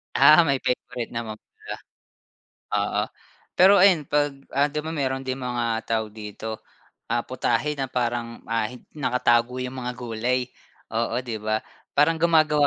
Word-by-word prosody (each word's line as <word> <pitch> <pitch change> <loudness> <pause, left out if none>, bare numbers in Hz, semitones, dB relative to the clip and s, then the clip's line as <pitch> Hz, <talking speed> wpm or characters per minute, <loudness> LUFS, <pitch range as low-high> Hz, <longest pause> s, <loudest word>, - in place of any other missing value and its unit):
Ah, 155 +5 +8
may 140 -4 +1
favorite 125 -1 -2
naman 110 -2 -4
pala, - - -9 1.0
oo. - - 0 0.6
Pero 190 +3 +8
ayan 180 -6 +5
'pag, 145 0 +2 0.2
ah, 145 +1 +3
'di 150 - -2
ba 160 +1 -4
mayroon 135 -2 0
din 130 - 0
mga 120 -3 -1
tawag 110 -2 -1
dito, 110 +1 -7 0.4
ah, 120 +1 0
putahe 130 +4 -1
na 135 - 0
parang, 120 -2 -2
ah, 115 -1 +1
hin 125 +2 -11
nakatago 125 -3 +1
yung 125 +1 -5
mga 125 0 -3
gulay. 125 +1 -2 0.4
Oo 115 +2 -1
'di 115 -3 -4
ba? 110 +1 -1 0.3
Parang 160 +3 +4
gumagawa 155 -3 +4
125 Hz, 150 wpm, -25 LUFS, 115-145 Hz, 1.0 s, Ah